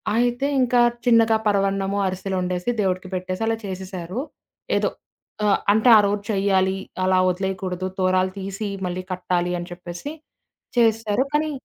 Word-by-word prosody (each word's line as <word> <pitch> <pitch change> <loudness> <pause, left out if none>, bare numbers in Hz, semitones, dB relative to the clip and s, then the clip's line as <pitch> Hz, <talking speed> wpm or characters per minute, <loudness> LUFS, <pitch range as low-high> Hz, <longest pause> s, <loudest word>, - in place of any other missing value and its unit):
అయితే 245 +3 +1
ఇంకా 245 -1 +3 0.2
చిన్నగా 225 -2 +5
పరవాన్నము, 195 0 +1
అరిసెలు 190 +1 -3
వండేసి 180 +3 -2
దేవుడికి 185 -1 -1
పెట్టేసి 185 +3 -3
అలా 225 - +1
చేసేశారు. 185 +1 -5 0.6
ఏదో. - - 0 0.6
ఆహ్, 200 - +3
అంటే 220 +3 +4
ఆ - - +7
రోజు 205 0 -1
చెయ్యాలి. 195 -1 +2 0.3
అలా 185 0 +3
వదిలేయకూడదు. 185 0 -2
తోరాలు 185 0 +2
తీసి 195 +2 -4 0.2
మళ్ళీ 180 +1 -4
కట్టాలి 180 -1 -1
అని 175 +1 -7
చెప్పేసి 175 - -7 0.7
చేసారు. 225 +1 +2
కానీ 305 +1 +2
195 Hz, 135 wpm, -23 LUFS, 185-220 Hz, 0.7 s, ఆ